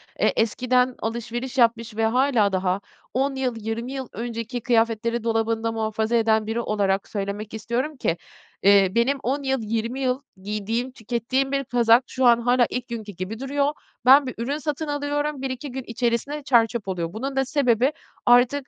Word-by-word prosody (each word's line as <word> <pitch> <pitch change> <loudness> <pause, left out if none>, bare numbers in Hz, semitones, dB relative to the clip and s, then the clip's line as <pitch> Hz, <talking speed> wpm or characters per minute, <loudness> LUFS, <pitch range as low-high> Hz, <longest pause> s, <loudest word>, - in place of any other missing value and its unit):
e - - +2
eskiden 250 +3 +1
alışveriş 235 +3 -4
yapmış 230 -2 +2
ve 225 0 +1
hâlâ 240 -4 +3
daha 185 +1 0 0.3
10 270 +2 0
yıl, 255 -3 -1
20 225 +3 -4
yıl 265 -3 -5
önceki 235 +1 -4
kıyafetleri 230 -1 +1
dolabında 225 0 0
muhafaza 220 +1 -1
eden 220 -1 +2
biri 230 +2 -1
olarak 200 -3 0
söylemek 205 +1 -4
istiyorum 245 +7 -2
ki, 170 -7 0 0.5
eee, 195 -1 +6
benim 265 +4 +2
10 275 +3 -1
yıl, 265 -2 0
20 230 +4 -2
yıl 260 +1 0 0.2
giydiğim, 220 +5 -2
tükettiğim 250 +3 -1
bir 275 0 0
kazak 235 0 +4
şu 260 0 -1
an 235 -1 +6
hâlâ 245 0 +3
ilk 250 0 -4
günkü 220 -3 -6
gibi 195 +5 -6
duruyor. 280 +2 0 0.3
Ben 270 +1 +7
bir 255 - -4
ürün 270 +6 -2
satın 300 +1 -3
alıyorum, 290 -1 -2
1-2 265 +1 -4
gün 265 0 -5
içerisinde 240 +5 -1
çer 235 -4 +4
çöp 225 -4 -5
oluyor. 170 -2 -3
Bunun 270 +5 -4
da 270 0 +2
sebebi 260 -2 +2 0.3
artık 245 +2 +4
235 Hz, 170 wpm, -24 LUFS, 225-265 Hz, 0.5 s, Ben